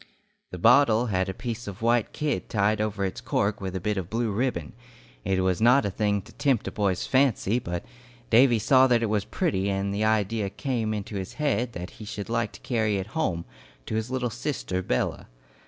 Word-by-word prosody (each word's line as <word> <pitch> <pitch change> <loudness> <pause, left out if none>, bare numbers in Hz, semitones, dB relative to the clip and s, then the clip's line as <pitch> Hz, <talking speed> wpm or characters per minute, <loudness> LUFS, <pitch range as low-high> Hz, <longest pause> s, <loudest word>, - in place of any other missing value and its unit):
The 90 - -7
bottle 120 +3 +5
had 95 +1 +1
a - - 0
piece 120 -1 -5
of 100 +2 -7
white 115 -1 +2
kid 150 -1 -2
tied 105 0 +1
over 105 -2 -1
its 95 - -4
cork 100 +1 0
with 95 -1 -4
a - - -1
bit 105 +3 -1
of 90 -2 -3
blue 115 0 -1
ribbon. 100 - -2 0.5
It 95 0 +1
was 95 +1 0
not 125 +3 +5
a 100 - -1
thing 100 -1 0
to - - -15
tempt 140 -5 +1
a - - -3
boy's 100 -3 0
fancy, 125 -4 +2
but 85 -6 -5 0.5
Davy 120 +1 +6
saw 130 +5 +5
that 120 -2 +3
it 110 - 0
was 105 -2 0
pretty, 100 - -1
and 100 0 -1
the 105 +2 -1
idea 110 -1 +1
came 115 -1 -2
into 105 -1 -4
his 95 -1 -5
head 125 -6 0
that 90 +2 -6
he - - -6
should 105 0 -6
like 115 0 0
to - - -11
carry 110 -4 0
it 95 +3 -5
home, 90 - -1 0.4
to - - -5
his 110 +1 -1
little 125 -2 -1
sister 105 -8 -3
Bella. 65 -8 -2
110 Hz, 210 wpm, -26 LUFS, 95-120 Hz, 0.5 s, Davy